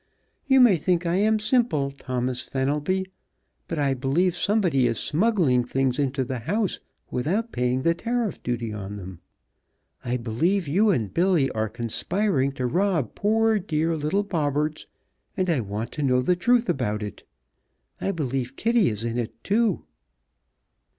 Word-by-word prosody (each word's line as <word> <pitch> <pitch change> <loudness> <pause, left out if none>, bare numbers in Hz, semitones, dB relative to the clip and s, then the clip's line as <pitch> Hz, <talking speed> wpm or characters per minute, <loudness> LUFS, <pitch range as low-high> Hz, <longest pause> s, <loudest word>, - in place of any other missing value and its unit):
You 265 -1 +6
may 225 -8 +6
think 175 +2 0
I 170 +2 +1
am 215 +2 +3
simple, 215 - +1
Thomas 125 -2 -3
Fenelby, 150 +8 -1 0.6
but 165 - -4
I 140 -2 +1
believe 145 +8 +1
somebody 180 - +2
is 115 - -1
smuggling 165 - +2
things 130 +1 0
into 135 -1 0
the 130 -1 -4
house 200 - -1 0.3
without 195 - -1
paying 125 +1 0
the 165 - +3
tariff 230 +2 -2
duty 120 -2 -3
on 105 -1 -6
them! 95 -3 -9 0.8
I 125 +1 -1
believe 155 - 0
you 200 +9 +3
and 115 - 0
Billy 170 -6 +2
are 110 0 -2
conspiring 140 - -1
to 130 -2 -3
rob 170 - 0
poor, 220 +1 +2
dear 165 -2 -1
little 155 +7 0
Bobberts, 155 -4 -1 0.5
and 185 -2 +1
I 155 - +1
want 105 +1 -4
to 150 - -5
know 125 -2 +2
the 180 +7 +2
truth 240 +6 +2
about 105 -5 -1
it! 105 -3 -7 0.8
I - - -1
believe 135 -7 -2
Kitty 230 +1 +2
is 105 0 -4
in 115 +1 -2
it 115 - -6
too!" 215 -2 +1
150 Hz, 155 wpm, -25 LUFS, 125-195 Hz, 0.8 s, You